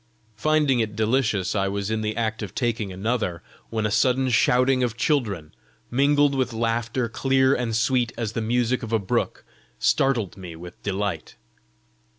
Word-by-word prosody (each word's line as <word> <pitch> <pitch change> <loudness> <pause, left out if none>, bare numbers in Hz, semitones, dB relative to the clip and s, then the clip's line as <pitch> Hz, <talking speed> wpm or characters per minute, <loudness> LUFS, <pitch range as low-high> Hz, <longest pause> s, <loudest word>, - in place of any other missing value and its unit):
Finding 150 +1 +2
it 110 -2 -1
delicious, 110 -4 +1
I 100 -1 +1
was 100 +1 -2
in 110 0 0
the 110 0 -2
act 110 -1 -1
of 100 -4 -6
taking 115 -5 -1
another, 95 -3 -2 0.3
when 110 -1 -1
a 105 - 0
sudden 130 +3 +2
shouting 130 +2 +3
of 120 -2 -1
children, 110 - 0 0.4
mingled 145 +2 +3
with 130 -3 -1
laughter 115 +2 -1
clear 130 +3 +2
and 120 -4 -1
sweet 120 +1 +1
as 115 -3 -2
the 115 - -3
music 120 +2 +1
of 115 -3 -6
a 115 - +3
brook, 100 -3 -2 0.3
startled 120 -9 +1
me 90 -3 -8
with 85 +2 -11
delight. 100 -4 -3
115 Hz, 165 wpm, -24 LUFS, 105-130 Hz, 0.4 s, shouting